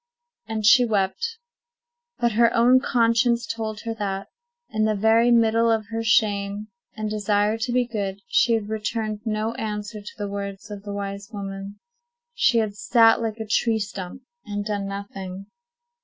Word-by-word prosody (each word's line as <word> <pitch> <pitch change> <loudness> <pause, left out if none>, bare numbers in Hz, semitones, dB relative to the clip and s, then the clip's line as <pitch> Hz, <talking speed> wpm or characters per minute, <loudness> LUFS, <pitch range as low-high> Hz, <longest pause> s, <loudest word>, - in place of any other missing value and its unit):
And 220 -1 -3
she 250 +4 +7
wept. 225 - -1 0.8
But 235 -1 +1
her 230 +2 +4
own 245 +3 +6
conscience 235 -1 +2
told 220 -2 -4
her 230 - -3
that, 195 -1 -3 0.4
in 215 0 +1
the 215 0 +1
very 220 +3 +4
middle 230 -1 +4
of 220 -1 +1
her 225 0 -2
shame 205 -1 +1 0.3
and 215 0 -3
desire 210 0 +1
to 235 +2 -2
be 250 0 +2
good, 200 -4 -4
she 235 - +3
had 220 -2 0
returned 215 0 -3
no 220 +1 -1
answer 210 0 -4
to 205 - -10
the 205 -1 -3
words 200 0 -6
of 205 -1 -6
the 205 0 -7
wise 200 0 -5
woman; 195 -1 -7 0.5
she 255 - +3
had 215 -3 0
sat 230 -5 +4
like 225 -1 -2
a 220 - -3
tree 220 +1 +1
stump, 205 +2 -6 0.2
and 205 -1 -4
done 205 -2 -2
nothing. 195 -1 -7
215 Hz, 165 wpm, -24 LUFS, 200-230 Hz, 0.8 s, she